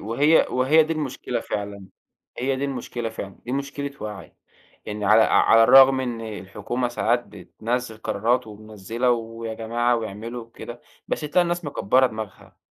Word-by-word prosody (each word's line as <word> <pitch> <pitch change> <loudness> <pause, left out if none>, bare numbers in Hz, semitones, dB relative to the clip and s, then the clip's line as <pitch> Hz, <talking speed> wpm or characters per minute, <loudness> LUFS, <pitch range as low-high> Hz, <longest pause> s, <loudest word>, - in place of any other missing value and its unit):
وهي 140 +9 +3
وهي 140 +5 +4
دي 160 +1 -2
المشكلة 150 -4 -3
فعلًا، 100 -1 -5 0.5
هي 130 +2 0
دي 140 - -2
المشكلة 125 -3 -4
فعلًا، 100 -4 -8
دي 125 - -5
مشكلة 140 +1 -3
وعي، 105 -2 -7 0.5
يعني 105 0 -4
على 110 +2 +6
على 115 +1 +5
الرغم 135 +1 +7
إن 120 -3 -3
الحكومة 110 +4 -4
ساعات 120 0 0
بتنزّل 110 +4 -4
قرارات 115 +3 0
ومنزّلة 110 +3 -3
ويا 115 -1 -3
جماعة 120 +2 0
واعملوا 115 +2 -6
وكده، 120 +1 -10 0.3
بس - - -1
تلاقى 155 +4 +2
الناس 175 0 -2
مكبَّرة 130 -2 +2
دماغها. 110 -4 -8
120 Hz, 145 wpm, -23 LUFS, 110-130 Hz, 0.5 s, الرغم